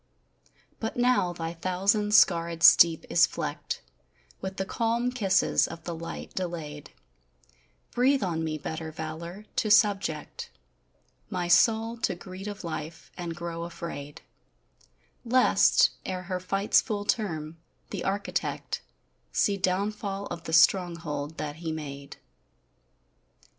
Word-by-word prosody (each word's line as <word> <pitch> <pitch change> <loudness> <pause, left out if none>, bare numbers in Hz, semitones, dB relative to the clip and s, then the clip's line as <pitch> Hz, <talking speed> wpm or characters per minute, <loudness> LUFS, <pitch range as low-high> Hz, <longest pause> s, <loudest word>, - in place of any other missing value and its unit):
But 225 +1 -4
now 245 -7 +3
thy 165 -1 -5
thousand 195 +4 +1
scarrèd 170 -4 +4
steep 165 -1 +7
is - - +5
flecked - - -4 0.6
With 190 0 -5
the 190 - -1
calm 235 +4 0
kisses 195 -6 +2
of 165 0 -9
the 170 - -4
light 165 0 -7
delayed, 155 -5 -5 1.0
Breathe 265 +1 +3
on 165 -3 -1
me 155 -1 -2
better 160 +1 -5
valor: 165 +6 -7
to 240 -4 +1
subject 200 -7 +2 0.8
My 180 -1 -2
soul 225 +4 +4
to 230 - -1
greed 185 +3 -9
of 205 -2 -6
life, 160 -1 -6
and 170 -2 -5
grow 170 0 -5
afraid 170 -4 -7 1.0
Lest, 250 +2 +4
ere 185 -1 -4
her 185 0 -3
fight's 195 +3 +2
full 205 -4 -3
term, 165 -8 -2 0.3
the - - -4
Architect 200 +1 -2 0.5
See 205 - +2
downfall 200 +1 -1
of 170 -1 -6
the 160 - -5
stronghold 165 -5 +2
that 150 0 -4
He 165 -1 -4
made. 140 -3 -7
180 Hz, 120 wpm, -27 LUFS, 165-205 Hz, 1.0 s, steep